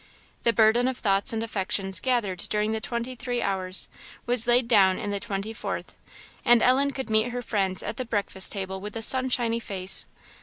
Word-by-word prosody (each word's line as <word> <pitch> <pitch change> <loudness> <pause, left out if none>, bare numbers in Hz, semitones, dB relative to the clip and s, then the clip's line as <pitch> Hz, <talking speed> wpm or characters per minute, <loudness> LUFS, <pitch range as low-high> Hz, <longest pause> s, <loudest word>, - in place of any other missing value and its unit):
The 235 - +2
burden 230 +2 +3
of 260 -1 -3
thoughts 195 -3 +1
and 225 -1 -3
affections 195 -3 -2
gathered 235 -8 -1
during 210 0 -1
the 220 0 -3
twenty 235 +2 -4
three 245 0 -4
hours, 190 -3 +1 0.4
was 245 -1 +1
laid 240 0 +3
down 195 -5 +4
in 205 - -4
the 200 - -2
twenty 195 +2 -5
fourth; - - -6 0.5
and 240 -2 +4
Ellen 270 +3 +3
could 265 -4 -6
meet 215 +2 +2
her 245 0 -5
friends 195 -5 -1
at - - -5
the 255 - -2
breakfast 200 -4 +5
table 190 -1 -5
with 210 +2 -8
a 225 - -4
sunshiny 250 -2 +2
face. 190 -4 -1
220 Hz, 190 wpm, -25 LUFS, 195-240 Hz, 0.5 s, breakfast